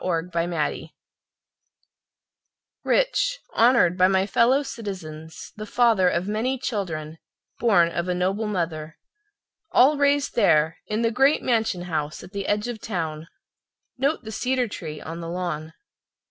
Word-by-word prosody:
Washington 170 Hz, -1 st, -1 dB
McNeely 155 Hz, -4 st, -2 dB, 1.9 s
Rich, -, -, +1 dB
honored 225 Hz, -7 st, +4 dB
by 185 Hz, -, +6 dB
my 190 Hz, 0 st, +2 dB
fellow 245 Hz, +7 st, +3 dB
citizens, 165 Hz, -, -8 dB
The 215 Hz, 0 st, -7 dB
father 225 Hz, -6 st, +3 dB
of 175 Hz, +2 st, -1 dB
many 225 Hz, +6 st, -1 dB
children, 165 Hz, -10 st, -4 dB, 0.4 s
born 190 Hz, -8 st, +4 dB
of 170 Hz, +1 st, -2 dB
a 180 Hz, -, 0 dB
noble 195 Hz, +5 st, 0 dB
mother, 165 Hz, -5 st, -3 dB, 0.7 s
All 285 Hz, +4 st, +5 dB
raised 285 Hz, 0 st, +2 dB
there 160 Hz, -7 st, +3 dB
In 215 Hz, +2 st, -1 dB
the 230 Hz, -, +2 dB
great 270 Hz, +5 st, +3 dB
mansion—house, 180 Hz, -, -1 dB
at 180 Hz, -, -12 dB
the 200 Hz, -1 st, -4 dB
edge 210 Hz, +2 st, 0 dB
of 235 Hz, -2 st, -5 dB
town. 160 Hz, -6 st, -4 dB, 0.7 s
Note 280 Hz, +1 st, 0 dB
the 220 Hz, -, -7 dB
cedar 250 Hz, +3 st, 0 dB
tree 155 Hz, -7 st, -7 dB
on 165 Hz, +3 st, -7 dB
the 165 Hz, -, -6 dB
lawn! 170 Hz, -3 st, -4 dB
190 Hz, 135 wpm, -24 LUFS, 165-235 Hz, 1.9 s, by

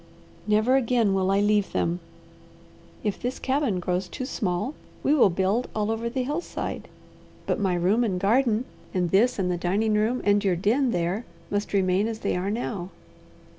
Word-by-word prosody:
Never 215 Hz, +5 st, +4 dB
again 235 Hz, -5 st, +2 dB
will 190 Hz, -1 st, +1 dB
I 195 Hz, +1 st, +3 dB
leave 205 Hz, -1 st, +2 dB
them. 170 Hz, +1 st, 0 dB, 1.0 s
If 210 Hz, -2 st, -2 dB
this 250 Hz, +1 st, -2 dB
cabin 265 Hz, -8 st, 0 dB
grows 180 Hz, +1 st, -1 dB
too 255 Hz, -, -5 dB
small, 210 Hz, 0 st, -2 dB, 0.3 s
we 285 Hz, -, +3 dB
will 275 Hz, -9 st, +5 dB
build 195 Hz, +7 st, 0 dB
all 215 Hz, 0 st, 0 dB
over 225 Hz, +1 st, -2 dB
the 255 Hz, +1 st, -2 dB
hillside; 300 Hz, +7 st, -4 dB, 0.6 s
but -, -, 0 dB
my 190 Hz, -3 st, +1 dB
room 190 Hz, +7 st, +2 dB
and 190 Hz, -6 st, 0 dB
garden 230 Hz, +3 st, +2 dB, 0.3 s
and 180 Hz, -2 st, 0 dB
this 235 Hz, +6 st, +3 dB
and 185 Hz, -2 st, 0 dB
the 175 Hz, -, -1 dB
dining 200 Hz, +5 st, +1 dB
room 220 Hz, +4 st, +1 dB
and 205 Hz, 0 st, +3 dB
your 190 Hz, -3 st, +2 dB
den 230 Hz, +9 st, +2 dB
there 180 Hz, +2 st, -1 dB, 0.3 s
must 205 Hz, +1 st, -1 dB
remain 195 Hz, +1 st, +2 dB
as 225 Hz, -1 st, -5 dB
they -, -, 0 dB
are 180 Hz, +2 st, -1 dB
now." 205 Hz, -4 st, -3 dB
210 Hz, 175 wpm, -25 LUFS, 185-240 Hz, 1.0 s, will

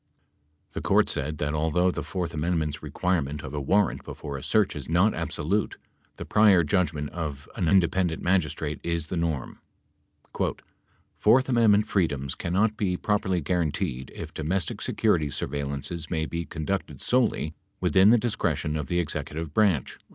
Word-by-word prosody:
The -, -, -5 dB
Court -, -, +3 dB
said 75 Hz, +3 st, -2 dB
that, 75 Hz, 0 st, -1 dB
although 80 Hz, +4 st, +2 dB
the -, -, -4 dB
fourth 90 Hz, -3 st, -4 dB
amendment's 80 Hz, -2 st, -1 dB
requirement 75 Hz, -6 st, -1 dB
of 65 Hz, -, -7 dB
a 75 Hz, -, -2 dB
warrant 100 Hz, +7 st, +1 dB
before 70 Hz, -, -7 dB
a 70 Hz, -, -5 dB
search 105 Hz, +5 st, +2 dB
is 75 Hz, -1 st, -7 dB
not 90 Hz, +6 st, +3 dB
absolute, 100 Hz, +8 st, -1 dB, 0.4 s
the -, -, -6 dB
prior 100 Hz, -5 st, +5 dB
judgment 75 Hz, -3 st, 0 dB
of 75 Hz, -4 st, -5 dB
an 90 Hz, -7 st, 0 dB
independent 90 Hz, -1 st, +2 dB
magistrate 90 Hz, -4 st, 0 dB
is 85 Hz, -2 st, -2 dB
the -, -, -2 dB
norm. 80 Hz, -6 st, -2 dB, 1.5 s
"Fourth 125 Hz, +5 st, +4 dB
amendment 110 Hz, -5 st, +4 dB
freedoms 75 Hz, -10 st, 0 dB
cannot 105 Hz, +5 st, 0 dB
be 90 Hz, -4 st, 0 dB
properly 95 Hz, -4 st, 0 dB
guaranteed 75 Hz, -6 st, -1 dB
if -, -, -7 dB
domestic 85 Hz, +3 st, -2 dB
security 85 Hz, -9 st, +1 dB
surveillances 70 Hz, +4 st, -4 dB
may 80 Hz, -2 st, -1 dB
be 85 Hz, +1 st, -4 dB
conducted 80 Hz, +6 st, -3 dB
solely 115 Hz, -, +1 dB, 0.3 s
within 95 Hz, +1 st, +5 dB
the 120 Hz, -, +7 dB
discretion 105 Hz, -9 st, -1 dB
of 75 Hz, -3 st, -4 dB
the 90 Hz, -, -1 dB
executive 75 Hz, -1 st, -3 dB
branch." 95 Hz, -, +2 dB
85 Hz, 150 wpm, -26 LUFS, 75-95 Hz, 1.5 s, the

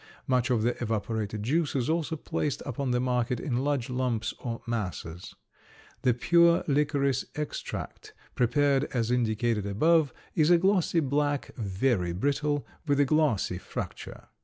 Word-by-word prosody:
Much 125 Hz, -2 st, +1 dB
of 120 Hz, -4 st, +2 dB
the 120 Hz, +1 st, +1 dB
evaporated 110 Hz, -2 st, -2 dB
juice 150 Hz, +6 st, 0 dB
is 125 Hz, -3 st, 0 dB
also 160 Hz, 0 st, 0 dB
placed 150 Hz, -2 st, -3 dB
upon 140 Hz, 0 st, -3 dB
the 125 Hz, 0 st, +2 dB
market 125 Hz, -1 st, 0 dB
in 120 Hz, -2 st, -2 dB
large 140 Hz, -4 st, 0 dB
lumps 125 Hz, -3 st, -1 dB
or 115 Hz, -2 st, -4 dB
masses. 90 Hz, -7 st, -4 dB, 0.7 s
The 125 Hz, -3 st, +3 dB
pure 170 Hz, +6 st, +4 dB
licorice 140 Hz, -2 st, +1 dB
extract, 150 Hz, 0 st, -6 dB, 0.2 s
prepared 140 Hz, +3 st, +2 dB
as 120 Hz, -4 st, -1 dB
indicated 115 Hz, -3 st, 0 dB
above, 155 Hz, +8 st, +3 dB, 0.2 s
is 155 Hz, 0 st, +3 dB
a 175 Hz, -, +7 dB
glossy 180 Hz, -2 st, +2 dB
black, 145 Hz, 0 st, -1 dB
very 100 Hz, -3 st, 0 dB
brittle, 145 Hz, +7 st, 0 dB, 0.2 s
with 145 Hz, -1 st, +2 dB
a 145 Hz, -, +5 dB
glassy 130 Hz, -, +1 dB
fracture. -, -, -7 dB
130 Hz, 140 wpm, -28 LUFS, 115-145 Hz, 0.7 s, a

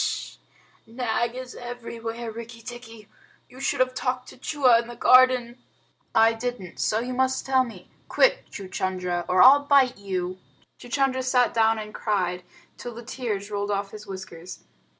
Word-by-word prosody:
"H'sh! -, -, -3 dB, 0.5 s
Nag 235 Hz, 0 st, -1 dB
is 255 Hz, 0 st, -7 dB
everywhere, 235 Hz, -1 st, -6 dB
Rikki 230 Hz, +1 st, -9 dB
tikki. 230 Hz, -3 st, -10 dB, 0.4 s
You 255 Hz, -, -15 dB
should 270 Hz, -, -1 dB
have 255 Hz, 0 st, +2 dB
talked 255 Hz, 0 st, -2 dB
to -, -, -13 dB
Chua 255 Hz, -4 st, +3 dB
in 235 Hz, -, -12 dB
the 240 Hz, -, -9 dB
garden." 255 Hz, 0 st, +5 dB, 0.6 s
"I 225 Hz, 0 st, +6 dB
didn't 225 Hz, -6 st, -5 dB
so 215 Hz, -, +1 dB
you 250 Hz, +1 st, -4 dB
must 260 Hz, +1 st, 0 dB
tell 265 Hz, -1 st, +3 dB
me. 210 Hz, -8 st, -10 dB, 0.2 s
Quick, -, -, +2 dB
Chuchundra, 185 Hz, -2 st, -3 dB
or 180 Hz, 0 st, +5 dB
I'll 280 Hz, +3 st, +8 dB
bite 270 Hz, -5 st, +4 dB
you!" 185 Hz, -2 st, -3 dB, 0.4 s
Chuchundra 260 Hz, +1 st, 0 dB
sat 250 Hz, -1 st, +2 dB
down 225 Hz, -1 st, +3 dB
and 215 Hz, -1 st, -7 dB
cried 180 Hz, -4 st, -1 dB, 0.4 s
till 240 Hz, -2 st, -7 dB
the 235 Hz, 0 st, -9 dB
tears 215 Hz, -5 st, -4 dB
rolled 205 Hz, 0 st, -2 dB
off 200 Hz, -1 st, -2 dB
his 210 Hz, -1 st, -10 dB
whiskers. 185 Hz, -2 st, -9 dB
235 Hz, 160 wpm, -25 LUFS, 205-255 Hz, 0.6 s, I'll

